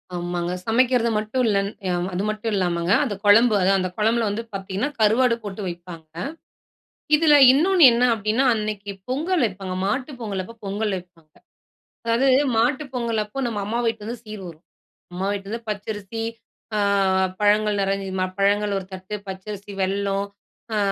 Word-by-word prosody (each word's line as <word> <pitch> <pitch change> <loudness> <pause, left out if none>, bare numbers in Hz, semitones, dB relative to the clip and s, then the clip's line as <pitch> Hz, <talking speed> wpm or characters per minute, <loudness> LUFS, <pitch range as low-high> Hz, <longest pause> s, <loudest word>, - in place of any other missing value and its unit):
ஆமாங்க. 175 0 -2
சமைக்கிறத 240 0 +3
மட்டும் 220 +4 -1
இல்லன் 200 -2 +1 0.2
யா 180 - +1 0.2
அது 185 +2 -1
மட்டும் 215 +1 -3
இல்லாமங்க. 175 -2 0
அந்த 230 -8 -2
கொழம்பு 220 +3 +6
அதான் 195 +1 +3
அந்த 185 0 -1
கொழம்பில 225 +1 +2
வந்து 210 +3 -3
பாத்தீங்கன்னா, 195 +6 -3
கருவாடு 230 +3 +4
போட்டு 205 0 -6
வைப்பாங்க, 170 -2 -9 1.0
இதில 300 0 +5 0.2
இன்னொன்னு 345 +5 +4
என்னா 240 +2 +3
அப்படின்னா, 220 +4 0
அன்னைக்கு 210 -2 -4 0.2
பொங்கல் 320 +7 0
வைப்பாங்க 190 -2 -6
மாட்டு 255 +8 -1
பொங்கல் 200 -4 -3
அப்போ 230 - -12
பொங்கல் 205 +2 -1
வைப்பாங்க, 170 -4 -13 0.7
அதாவது 235 +4 +3 0.3
மாட்டு 255 +6 +2
பொங்கல் 230 -3 0
அப்போ, 210 +6 -7
நம்ம 215 -3 -3
அம்மா 225 +4 -1
வீட்லருந்து 225 +1 -3
சீர் 215 -2 -8
வரும். 165 0 -13 0.5
அம்மா 185 +2 -2
வீட்டிலேருந்து 210 +3 -6
பச்சரிசி, 210 +1 -4 0.5
அ - - +1 0.6
பழங்கள் 210 0 +3
நெறைஞ்சு 195 0 -1
மா - - +2
பழங்கள் 205 +1 +2
ஒரு 190 - -9
தட்டு, 185 +2 -6
பச்சரிசி, 200 +2 -7
வெல்லம், 195 +1 0 0.5
அ - - +1
210 Hz, 150 wpm, -23 LUFS, 195-230 Hz, 1.0 s, கொழம்பு